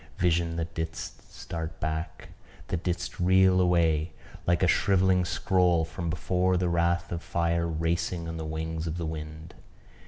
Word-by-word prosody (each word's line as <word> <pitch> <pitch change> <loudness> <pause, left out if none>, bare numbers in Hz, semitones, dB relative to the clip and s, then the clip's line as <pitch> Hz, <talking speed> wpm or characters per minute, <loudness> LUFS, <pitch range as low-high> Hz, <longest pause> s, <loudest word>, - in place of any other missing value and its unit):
vision 85 -1 +1
that 85 0 -3
didst 80 0 -6
start 80 -1 -6
back 80 0 -4 0.4
that 85 - -1
didst 85 -1 -3
reel 95 +1 +5
away 85 -3 +2 0.4
like 85 +1 +3
a - - +5
shrivelling 95 0 +3
scroll 90 -2 +2
from 85 +1 -5
before 90 +2 +1
the 90 0 +1
wrath 85 0 +1
of 85 -1 -3
fire 85 -1 0
racing 85 +1 -1
on 80 - -5
the 80 - -4
wings 80 +1 -3
of 80 +1 -3
the 85 - -3
wind! 80 0 -6
85 Hz, 155 wpm, -28 LUFS, 80-90 Hz, 0.4 s, reel